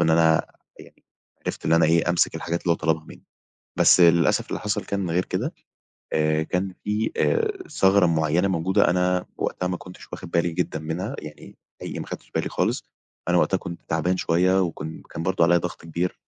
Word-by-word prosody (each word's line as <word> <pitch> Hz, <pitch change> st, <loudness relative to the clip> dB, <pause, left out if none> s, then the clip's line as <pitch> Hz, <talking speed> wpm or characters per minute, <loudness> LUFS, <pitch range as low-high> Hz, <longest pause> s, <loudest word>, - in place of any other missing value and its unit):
إن 80 Hz, -, +3 dB
أنا 80 Hz, 0 st, +4 dB, 0.3 s
يعني -, -, -16 dB, 0.4 s
عرفت -, -, -4 dB
اللي 80 Hz, +1 st, +4 dB
أنا 85 Hz, -, +4 dB
إيه، 85 Hz, +1 st, +3 dB
أمسك 85 Hz, -1 st, +2 dB
الحاجات 85 Hz, +1 st, -3 dB
اللي 85 Hz, -, +2 dB
هو -, -, 0 dB
طلبها 80 Hz, -1 st, 0 dB
منّي. -, -, -14 dB, 0.6 s
بس -, -, +6 dB
للأسف 85 Hz, -1 st, +4 dB
اللي -, -, -4 dB
حصل 105 Hz, 0 st, -2 dB
كان 100 Hz, -4 st, -2 dB
غير 90 Hz, +2 st, +1 dB
كده، -, -, -3 dB, 0.6 s
آآ 75 Hz, 0 st, +2 dB
كان 90 Hz, +3 st, -2 dB
في 105 Hz, +2 st, -1 dB
آآ 425 Hz, -5 st, 0 dB
ثغرة 95 Hz, -1 st, +4 dB
معيّنة 80 Hz, +3 st, +2 dB
موجودة، 95 Hz, 0 st, +2 dB
أنا 90 Hz, 0 st, +1 dB
وقتها 90 Hz, -, -2 dB
ما 90 Hz, -1 st, -2 dB
كنتش 90 Hz, 0 st, -12 dB
واخِد 85 Hz, -, -7 dB
بالي 85 Hz, 0 st, +1 dB
جدًا 80 Hz, -2 st, -2 dB
منها، 90 Hz, -, -4 dB
يعني 75 Hz, 0 st, -11 dB, 0.2 s
أي -, -, -5 dB
ما -, -, -5 dB
أخدتش -, -, -9 dB
بالي -, -, -1 dB
خالص، -, -, -1 dB, 0.5 s
أنا 90 Hz, -, +4 dB
وقتها 95 Hz, -, +2 dB
كنت 85 Hz, -1 st, -8 dB
تعبان 90 Hz, +3 st, +1 dB
شوية 95 Hz, +3 st, +2 dB
وكن 80 Hz, -3 st, -4 dB
كان 80 Hz, -, -5 dB
برضه 95 Hz, -2 st, +2 dB
عليّا 85 Hz, +1 st, +5 dB
ضَغْط 85 Hz, 0 st, -5 dB
كبير، 85 Hz, +2 st, -3 dB
85 Hz, 190 wpm, -24 LUFS, 80-95 Hz, 0.6 s, بس